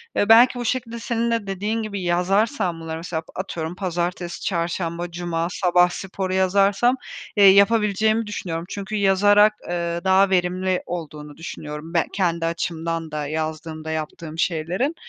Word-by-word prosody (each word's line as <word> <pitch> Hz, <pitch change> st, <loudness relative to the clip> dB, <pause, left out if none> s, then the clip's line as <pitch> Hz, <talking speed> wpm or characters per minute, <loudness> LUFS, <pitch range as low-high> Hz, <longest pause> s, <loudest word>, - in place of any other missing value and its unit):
Eee, 205 Hz, -, +1 dB
belki 245 Hz, +2 st, +7 dB
bu 240 Hz, -, -3 dB
şekilde 235 Hz, -1 st, -2 dB
senin 235 Hz, 0 st, -1 dB
de 230 Hz, -3 st, -1 dB
dediğin 210 Hz, +4 st, -2 dB
gibi 200 Hz, -2 st, -4 dB
yazarsam 180 Hz, -, +1 dB
bunları, 160 Hz, 0 st, -5 dB
mesela, 165 Hz, -1 st, -4 dB
atıyorum, 175 Hz, -3 st, -4 dB
pazartesi, 175 Hz, -1 st, -3 dB
çarşamba, 170 Hz, -1 st, -2 dB
cuma, 170 Hz, -1 st, -2 dB
sabah 180 Hz, -2 st, +3 dB
sporu 185 Hz, +1 st, -4 dB
yazarsam, 195 Hz, +6 st, +3 dB, 0.4 s
eee, 200 Hz, -, +8 dB
yapabileceğimi 215 Hz, +2 st, +4 dB
düşünüyorum. 170 Hz, -5 st, -4 dB
Çünkü 200 Hz, +1 st, -5 dB
yazarak, 205 Hz, +1 st, +5 dB, 0.2 s
eee, 170 Hz, -1 st, -2 dB
daha 190 Hz, +1 st, +4 dB
verimli 185 Hz, 0 st, +1 dB
olduğunu 150 Hz, -4 st, -7 dB
düşünüyorum 155 Hz, 0 st, -7 dB
ben 170 Hz, -, +2 dB
kendi 170 Hz, -4 st, 0 dB
açımdan 165 Hz, -1 st, -3 dB
da, 150 Hz, -1 st, -3 dB
yazdığımda 155 Hz, +1 st, -4 dB
yaptığım 160 Hz, +1 st, -5 dB
şeylerin. 180 Hz, -, -1 dB
180 Hz, 140 wpm, -22 LUFS, 165-200 Hz, 0.4 s, eee